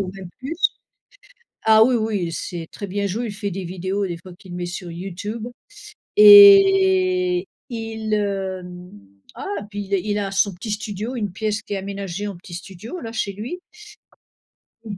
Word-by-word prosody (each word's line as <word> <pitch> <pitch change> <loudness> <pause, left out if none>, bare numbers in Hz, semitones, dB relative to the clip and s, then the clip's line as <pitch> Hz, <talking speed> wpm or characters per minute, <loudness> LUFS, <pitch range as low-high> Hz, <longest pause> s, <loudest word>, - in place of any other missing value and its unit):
ou 190 -2 -3
même 190 -2 -9
plus. 280 +6 -5 1.1
Ah 220 0 +8
oui, 250 +2 +3
oui, 215 -5 -1
il 165 - -6
sait 165 0 -5
très 200 - -7
bien 200 +2 -2
jouer, 220 +5 -2
il 215 - -5
fait 205 -1 -4
des 190 +2 -5
vidéos 190 +3 -2
des 175 -2 -5
fois 185 +1 -13
qu'il 175 0 -11
met 175 0 -3
sur 175 0 -6
YouTube 195 +6 -6 0.7
et 385 -3 +7 0.2
il, 225 -2 -3
hem 190 -3 -3 0.4
ah - - -8 0.3
puis 205 - -5
il 200 - -1
a 195 - +3
il 205 +2 -2
a 200 -1 -2
son 195 +1 +1
petit 210 +5 -7
studio, 210 +3 -4
une 205 -5 -3
pièce 215 +2 -2
qui - - -5
est - - -1
aménagée 195 0 -5
en 200 - -5
petit 175 0 -11
studio, 195 - -8
là 225 -1 -7
chez 200 -3 -2
lui. 245 - -6 1.2
Il 210 -3 -7
205 Hz, 180 wpm, -22 LUFS, 185-225 Hz, 1.2 s, Ah